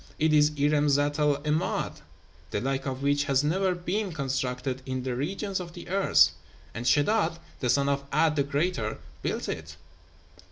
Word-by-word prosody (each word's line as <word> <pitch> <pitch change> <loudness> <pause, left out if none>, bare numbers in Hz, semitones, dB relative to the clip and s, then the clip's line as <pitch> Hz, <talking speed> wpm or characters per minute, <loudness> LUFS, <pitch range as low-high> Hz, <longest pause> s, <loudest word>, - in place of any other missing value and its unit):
It 155 0 +2
is 150 0 +6
Irem 145 +1 +3
Zat 145 +1 +2
el 150 -1 +3
'Emád, 155 +4 -1 0.5
the - - -1
like 135 +1 -2
of 130 0 -4
which 145 0 +2
hath 135 -1 +2
never 185 +4 +1
been 185 +3 -2
constructed 130 -2 -2
in 130 -1 -3
the 125 -1 -2
regions 190 - -2
of 170 -2 -7
the 175 - -10
earth; 195 +1 +5 0.4
and 120 +2 -4
Sheddád, 165 - +3 0.2
the 125 - -1
son 140 +3 +3
of 140 0 0
'A'd 155 +1 +3
the 145 - +2
Greater, 140 -5 -1 0.2
built - - -2
it.' - - -5
145 Hz, 170 wpm, -27 LUFS, 135-170 Hz, 0.5 s, is